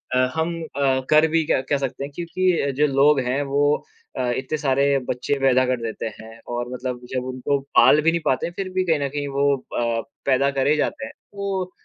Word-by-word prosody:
अ, - - +3 0.2
हम 165 +1 -1
अ, 135 -3 0
कर 155 +1 +6
भी 165 0 +1
क्या 130 - +1
क्या 140 +1 0
सकते 135 0 -4
हैं, 140 - -6
क्योंकि 175 -3 0
जो 150 - +5
लोग 140 +1 +5
हैं 135 +3 0
वो 145 - +3 0.5
अ, - - 0 0.2
इतने 135 +4 -3
सारे 140 -2 +1 0.3
बच्चे 125 +3 -1
पैदा 130 -1 +4
कर 125 -2 -1
देते 115 0 -4
हैं 115 +1 -12
और 120 0 -3
मतलब 125 -1 -4
जब 130 -1 -3
उनको 130 +2 -1 0.2
पाल 150 - +6
भी 165 +2 +3
नहीं 170 -1 -1
पाते 135 +5 +1
फ़िर 190 +1 -5
भी 185 0 +1
कहीं 160 -4 +2
न 140 -1 -1
कहीं 145 0 -3
वो 140 0 +2
अ, 115 -2 -2 0.2
पैदा 140 +1 +3
करे 140 +2 +2
जाते 270 - -2
हैं। - - -8 0.2
वो 190 -2 -3
140 Hz, 215 wpm, -22 LUFS, 130-160 Hz, 0.5 s, कर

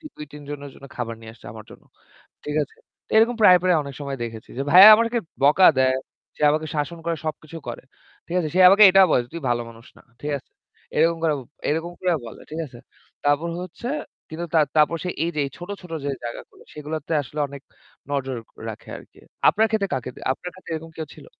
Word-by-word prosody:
২-৩ 150 0 -10
জনের 145 -1 -6
জন্য 140 - -13
খাবার 115 -2 -4
নিয়ে 110 0 -10
আসছে - - -18
আমার 110 -1 -11
জন্য। - - -15 0.6
ঠিক 150 - -4
আছে? 140 - -9 0.4
এরকম 225 +2 +5
প্রায়, 185 -4 +8
প্রায় 180 -2 +3
অনেক 140 -1 -8
সময় 140 -1 -4
দেখেছি 115 -2 -7
যে - - 0
ভাইয়া 185 +6 +11
আমাদেরকে 230 +2 +1 0.2
বকা 150 +7 +6
দেয়। 130 0 +3 0.4
সে - - -8
আমাকে 155 +1 -1
শাসন 155 +3 -2
করে 170 -1 -1
সবকিছু 155 +1 -6
করে। 120 - -6 0.7
সে - - +1
আমাকে 200 +3 +6
এটা 195 +1 +6
বলে, 125 - +3
"তুই 170 - -5
ভালো 120 0 +1
মানুষ 115 +1 -16
না।" - - -19 0.2
ঠিক 150 0 -2
আছে? 130 - -23 0.5
এরকম 165 +2 +3
করে 155 -2 +3 0.3
এরকম 165 +3 -1
করে 185 -1 +1
বলে। 115 - -10
ঠিক 160 +2 -4
আছে? 125 -3 -14 0.5
তারপর 145 +3 +2
হচ্ছে 185 +7 -7 0.4
কিন্তু 165 +2 -5
তার 155 -2 +5
তারপর 155 +2 +4 0.3
এই 170 - 0
যে - - +1 0.2
ছোট, 175 +1 -9
ছোট 180 -2 -11
যে 145 - -1
জায়গাগুলো 120 - -8
সেগুলোতে 150 +1 -5
আসলে 145 +3 -10
অনেক 140 0 -10 0.5
নজর 135 -2 -2 0.3
রাখে - - -9
আরকি। - - -16 0.3
আপনার 220 +1 +4
ক্ষেত্রে 215 -3 0
কাকে 130 -1 -4 0.2
আপনার 180 +6 -8
ক্ষেত্রে 185 -3 -9
এরকম 160 +1 -7
কেউ 160 - -5
ছিল? - - -14
155 Hz, 195 wpm, -23 LUFS, 140-175 Hz, 0.7 s, ভাইয়া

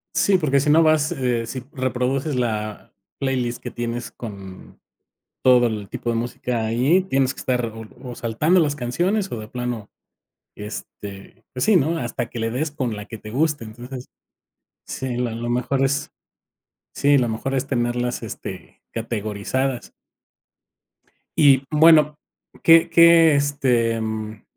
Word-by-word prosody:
Sí, 195 -2 +4
porque 140 -5 +2
si 150 +2 0
no 160 +2 +6
vas, 155 -1 +3
eh, 120 -3 -1
si 130 +1 -6
reproduces 130 +2 -1
la 110 -3 -3 0.3
playlist 125 -3 -1
que - - -5
tienes 120 0 -4
con 100 -5 -10 0.6
todo 125 -1 +5
el 105 -3 -4
tipo 120 - -3
de 115 - -1
música 120 0 -2
ahí, 130 +11 +3
tienes 135 -7 +1
que - - -10
estar 125 -2 0
o 115 0 -8 0.2
o 125 -2 -7
saltando 135 +11 +1
las 145 -2 +1
canciones 175 - -1
o 120 - -4
de 110 - -7
plano, 120 -3 -5 0.7
este, 100 -1 -9
pues 125 - -2
sí, 215 - +4
¿no?, 165 +2 +1
hasta 120 -2 -3
que 120 - -7
le 115 0 -1
des 145 +5 -2
con 125 -7 -3
la 105 0 -7
que 115 - -8
te 110 - -10
guste. 145 +2 0
Entonces, 125 +3 -9 0.8
sí, 130 -2 -4
la 125 -2 -1
lo 120 +1 -4
mejor 125 +3 0
es 140 +2 0 0.8
sí, 145 0 +3
lo 120 -3 +1
mejor 125 +5 -3
es 135 +1 -1
tenerlas, 120 -1 -1
este, - - -8
categorizadas. 115 +3 -3 1.5
Y, 140 -3 +6
bueno, 155 -1 +6 0.5
¿qué 165 0 +6
qué, 170 -2 +7
este, 125 -5 +1
mm 110 -1 -5
125 Hz, 150 wpm, -22 LUFS, 115-145 Hz, 1.5 s, qué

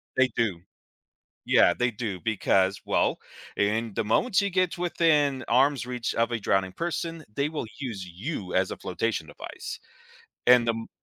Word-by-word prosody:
They 130 -1 +4
do. 100 -8 0 0.8
Yeah, - - +5
they 125 0 +1
do, 105 -5 -4
because, 100 -3 +1
well, - - +1 0.4
i - - +3
in 110 +1 0
the - - -1
moment 190 - +1
she 200 0 +4
gets 185 -1 0
within 150 -6 +2
arm's 135 +2 +3
reach 125 -2 -3
of 115 +1 +1
a 120 - -1
drowning 95 -3 0
person, 165 - -3
they 140 +1 0
will 150 -6 -4
use 110 -9 -5
you 95 - -5
as 95 0 +2
a - - -4
flotation 90 -1 -2
device, - - -8 0.7
and, 125 -1 +6
um 115 0 -2
120 Hz, 165 wpm, -27 LUFS, 100-145 Hz, 0.8 s, and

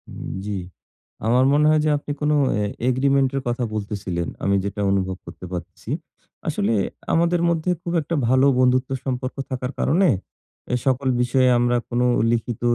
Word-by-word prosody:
উম - - -7 0.2
জি। 105 -1 -2 0.7
আমার 125 +3 +4
মনে 150 +1 +4
হয় 155 0 +4
যে - - +3
আপনি 145 0 -6
কোন 150 0 +2 0.2
অ্যা 105 0 0 0.2
এগ্রিমেন্ট 135 +1 +2
এর 135 - 0
কথা 120 +1 -1
বলতেছিলেন। 100 -5 -3 0.2
আমি 100 0 +2
যেটা 100 +1 -3
অনুভব 95 -1 0
করতে - - -10
পারতেছি। 85 -2 -7 0.6
আসলে 105 +3 0 0.4
আমাদের 170 +1 +2
মধ্যে 165 +1 0
খুব 170 0 -4
একটা 160 +3 -3
ভালো 130 +2 +4
বন্ধুত্ব 130 0 +3 0.2
সম্পর্ক 130 0 -3
থাকার 130 0 -3
কারণে 180 +5 +3 0.7
এ - - +4
সকল 130 0 +1
বিষয়ে 125 +1 +3
আমরা 120 0 +2
কোনো 125 0 +1 0.3
লিখিত 120 0 -2
125 Hz, 160 wpm, -22 LUFS, 105-140 Hz, 0.7 s, আমার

